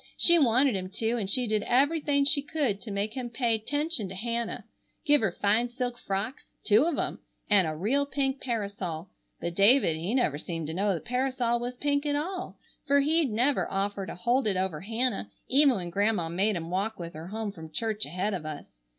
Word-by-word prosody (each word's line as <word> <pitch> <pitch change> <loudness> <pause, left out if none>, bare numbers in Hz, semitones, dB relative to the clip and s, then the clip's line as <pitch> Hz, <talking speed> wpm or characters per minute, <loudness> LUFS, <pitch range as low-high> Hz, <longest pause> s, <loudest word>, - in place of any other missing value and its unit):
She 340 0 +6
wanted 255 -2 +4
him 185 -1 -4
to 225 +2 0
an' 200 - -2
she 250 +5 +2
did 215 -2 0
everything 280 +3 +2
she 285 0 +5
could 280 -8 -1
to 230 - -8
make 205 +2 -2
him 250 -2 -4
pay 235 -2 0
'tention 290 - -1
to 190 - -7
Hannah, 235 +3 -3 0.4
give 295 -1 +5
her 220 -4 +1
fine 215 +6 +1
silk 245 0 -4
frocks, 200 +7 -4
two 220 +6 +4
of 335 -4 0
'em, - - -2 0.3
and 195 -5 +5
a 155 - -3
real 260 - 0
pink 270 -1 -1
parasol, 200 -8 -4 0.3
but 170 - -3
David 200 - +4
he 180 +9 -2
never 155 - +1
seemed 165 -1 -5
to 160 - -5
know 195 +2 +1
the 165 - -5
parasol 250 -1 0
was 245 +1 -5
pink 285 +1 0
at 290 - +1
all, 365 +5 -4 0.3
fer 280 0 +4
he'd 310 0 +2
never 245 +6 +1
offer 195 0 -2
to - - -6
hold 240 +6 +1
it 195 -3 +1
over 185 -5 -2
Hannah 225 - -1 0.2
even 275 0 +5
when 175 -4 -4
Grandma 200 -3 +1
made 195 +5 +1
him 170 0 -5
walk 200 +4 -1
with 170 -1 -7
her 160 +2 -8
home 215 +1 -4
from 160 -4 -11
church 215 +4 -1
ahead 185 +7 -2
of 180 -4 -4
us. 150 - -8
220 Hz, 210 wpm, -28 LUFS, 190-265 Hz, 0.4 s, She